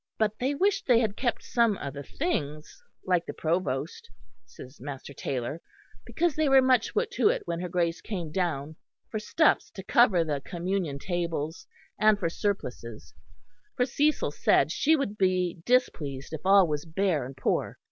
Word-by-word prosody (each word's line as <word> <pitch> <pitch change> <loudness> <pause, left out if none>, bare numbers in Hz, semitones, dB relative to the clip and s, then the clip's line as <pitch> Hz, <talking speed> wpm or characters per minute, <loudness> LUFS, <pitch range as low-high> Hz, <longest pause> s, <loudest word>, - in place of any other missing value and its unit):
But 215 -1 0
they 270 +3 0
wished 390 +5 +1
they 245 -3 +6
had 215 -4 0
kept 240 0 -1
some 230 -4 +2
of 140 -2 -6
the 140 - -6
things, 155 - -4 0.2
like 180 -2 +1
the - - -6
Provost, 160 -3 -2 0.4
says 125 +4 -13
Master 140 0 -7
Taylor, 135 +4 -4 0.5
because 340 -2 0
they 310 -2 +2
were 270 0 +7
much 255 -3 +2
put 450 +1 0
to - - +3
it - - -1
when 170 0 -3
her 180 0 -4
Grace 170 -1 0
came 175 -8 -5
down 160 -4 -2 0.3
for 215 - -2
stuffs 310 +8 +2
to 190 - -7
cover 210 -6 +4
the 145 -3 -2
communion 175 -3 -3
tables 165 -1 -3 0.3
and 215 -1 +5
for 175 -5 -1
surplices, 125 - -4 0.6
for 250 - +3
Cecil 290 - +1
said 145 0 +2
she 315 - +3
would 220 -8 -3
be 180 -2 +1
displeased 150 - 0
if 155 - -5
all 195 -2 +6
was 150 -1 -2
bare 165 -3 0
and 130 +2 -9
poor. - - -1
180 Hz, 170 wpm, -27 LUFS, 150-235 Hz, 0.6 s, were